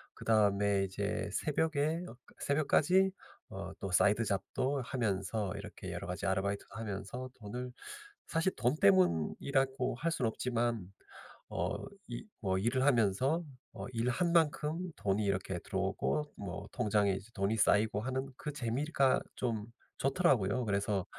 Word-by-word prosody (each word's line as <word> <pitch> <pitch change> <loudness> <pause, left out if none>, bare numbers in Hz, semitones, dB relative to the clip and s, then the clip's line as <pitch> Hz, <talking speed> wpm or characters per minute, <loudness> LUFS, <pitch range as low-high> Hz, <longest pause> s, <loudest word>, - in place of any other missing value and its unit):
그다음에 100 -2 +3
이제 100 +2 -2
새벽에 155 - +1
어 - - -10 0.2
새벽까지 170 +6 +3 0.4
어 - - -6
또 95 - -4
사이드 105 +5 +4
잡도 130 +8 -1
하면서 110 -5 -1
이렇게 - - -7
여러 - - -5
가지 90 - -4
아르바이트도 100 +1 -1
하면서 110 +4 -5
돈을 125 +4 -6 0.6
사실 165 +4 +1
돈 125 +5 +2
때문이라고 120 - +3
할 165 +6 -1
순 130 - 0
없지만 115 -3 0 0.6
어 - - -1 0.3
이 - - -5 0.2
뭐 95 -2 +1
일을 120 +6 +1
하면서 130 - +3 0.3
아 - - -5
일 115 +2 +1
한 170 +5 +1
만큼 155 0 +2 0.2
돈이 100 +1 +1
이렇게 95 -2 -1
들어오고 150 - -1
뭐 100 +1 -6
통장에 105 -2 +2
이제 100 +4 -6
돈이 100 +2 +1
쌓이고 105 0 +3
하는 130 +2 -2
그 150 - -4
재미가 135 +2 +1
좀 110 -4 -1 0.3
좋더라고요. 130 - +2
그래서 100 -2 0
115 Hz, 290 characters per minute, -33 LUFS, 100-135 Hz, 0.6 s, 사이드